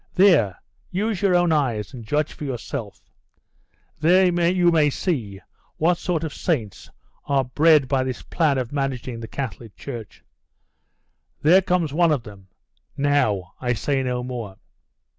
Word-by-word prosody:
There 160 - +4 0.3
use 205 +1 -2
your 195 -3 +3
own 175 -1 +3
eyes, 120 -8 0
and 120 -3 -8
judge 150 +6 -1
for - - -9
yourself. 125 -4 -6 0.9
There 180 +5 +5 0.2
you 180 -1 +3
may 155 -3 +4
see 120 - -3 0.4
what 170 +2 +2
sort 170 -3 -1
of 160 - -4
saints 115 - -3 0.4
are 140 -1 +1
bred 150 +2 +4
by 130 0 +1
this 130 -2 -5
plan 155 -5 +1
of 125 -2 -3
managing 130 -4 -3
the 115 - -7
Catholic 115 -5 -6
Church. 115 -7 -9 1.2
There 175 +6 +6
comes 180 -5 0
one 170 +1 +3
of 140 -6 0
them. 100 -3 -13 0.5
Now! 110 -10 +1
I 125 -1 0
say 135 +4 -1
no 125 -1 -2
more! 120 -6 -6
140 Hz, 145 wpm, -23 LUFS, 120-165 Hz, 1.2 s, There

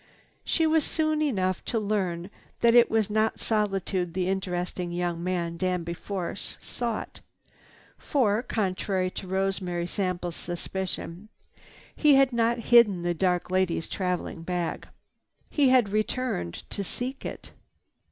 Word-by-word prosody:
She 325 - +2
was 315 -1 +3
soon 310 0 0
enough 190 - 0
to 230 - 0
learn 195 -4 -1 0.3
that 235 -1 +5
it 240 -1 +7
was 220 -2 +2
not 220 +1 +1
solitude 195 -5 0
the 185 -1 0
interesting 180 -2 -2
young 175 -1 -2
man, 175 -2 -1
Danby 180 -2 -1
Force, 185 +1 -5
sought. 235 -3 -4 0.8
For, 225 -6 +2
contrary 190 -5 -1
to 190 - -7
Rosemary 190 -2 -1
Sample's 180 -2 -2
suspicion, 185 +2 -5 0.7
he 295 -2 +5
had 270 -2 +5
not 235 0 +2 0.2
hidden 210 -7 +7
the 175 0 +1
dark 180 +1 0
lady's 185 -3 +1
traveling 180 -3 -2
bag. 175 0 -3 0.6
He 280 -3 +4
had 250 -5 +5
returned 215 - -2
to 200 - -3
seek 255 +7 -4
it. - - -7
190 Hz, 130 wpm, -27 LUFS, 180-225 Hz, 0.8 s, it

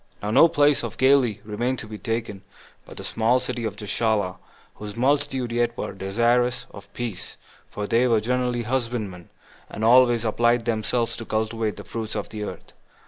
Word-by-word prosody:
1. 105 +1 -2
Now 130 - +6
no 165 - +9
place 145 -3 +3
of - - -5
Galilee 130 -5 +3
remained 120 +5 -2
to 110 - -6
be 105 -1 -8
taken 115 -4 -3 0.5
but - - -12
the - - -7
small 115 +3 +2
city 125 -2 -4
of 105 -2 -3
Gischala, 105 -2 0 0.4
whose 105 -1 -8
multitude 135 -1 +1
yet 120 0 0
were - - -4
desirous 120 +6 +1
of 100 0 -13
peace; 115 -7 -5 0.3
for 105 - -4
they 115 +4 +3
were 115 -3 +3
generally 125 +1 -1
husbandmen, 115 -7 -3 0.4
and 110 - -6
always 120 -1 +5
applied 120 +1 +2
themselves 115 +1 0
to 115 - -7
cultivate 110 0 -2
the - - -8
fruits 110 -1 -5
of 105 - -4
the 105 0 -6
earth. 105 - -7
115 Hz, 180 wpm, -24 LUFS, 105-125 Hz, 0.5 s, no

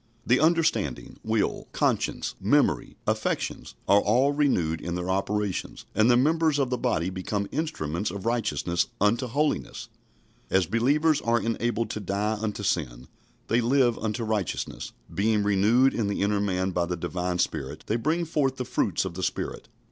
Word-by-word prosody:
The 125 +2 +4
understanding, 155 - +1
will, 110 -1 -1
conscience, - - 0
memory, - - +2
affections - - -2
are 100 - +6
all 125 +7 +3
renewed 90 - +1
in 85 0 -3
their 90 +1 -2
operations, 100 +1 -2
and 110 +3 +4
the 120 - +6
members 155 +3 +2
of 135 -3 0
the 125 - +1
body 85 -3 0
become 100 +2 -3
instruments 90 - -2
of 95 +2 -7
righteousness 110 -7 0
unto 115 +5 +2
holiness. 145 +6 -1 0.6
As 95 -1 +3
believers 145 - +2
are 115 0 +2
enabled 115 0 -1
to - - -4
die 105 +2 -1
unto 105 -2 -3
sin, 65 -10 -2 0.4
they 120 +1 +2
live 120 0 +2
unto 110 +1 -2
righteousness. 110 -6 -3 0.2
Being 105 +1 +2
renewed 105 +6 +4
in 110 -3 -1
the 100 -1 -1
inner 100 0 +1
man 95 -2 0
by 85 -1 0
the 90 0 -3
Divine 90 +1 -2
Spirit, 75 -3 -2
they 110 - 0
bring 160 +9 0
forth 145 -5 0
the 125 - -4
fruits 95 -5 0
of 95 - -4
the 95 - -6
Spirit. - - -3
105 Hz, 165 wpm, -26 LUFS, 95-125 Hz, 0.6 s, are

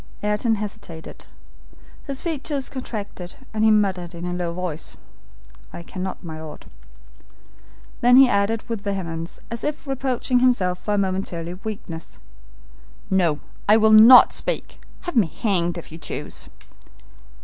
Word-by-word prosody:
Ayrton 210 +2 +1
hesitated. 205 -6 -8 0.8
His 275 -2 -4
features 295 -4 -3
contracted, 205 -8 -6 0.2
and 215 0 0
he 220 - +6
muttered 190 -5 +1
in 170 +1 -6
a 180 - -2
low 175 -1 -2
voice, 170 -3 -5 0.7
"I 170 - -8
cannot, 185 +2 -6
my 160 -2 -7
Lord." 155 -1 -10 1.4
Then 245 +1 +6
he 270 0 +9
added 205 +1 0
with 230 -4 -3
vehemence, 170 -5 -4
as 230 - -5
if 300 0 -3
reproaching 260 -2 0
himself 200 -8 +2
for 210 - 0
a - - 0
momentary 185 -3 -2
weakness: 185 -4 -7 0.9
"No, 170 -6 +2 0.3
I 215 - +8
will 220 0 +5
not 230 +4 +9
speak. - - -3 0.2
Have 350 - -6
me 215 -8 +4
hanged, 175 0 -1
if 170 - -9
you 160 - -9
choose." 150 - -5
200 Hz, 140 wpm, -23 LUFS, 175-230 Hz, 1.4 s, he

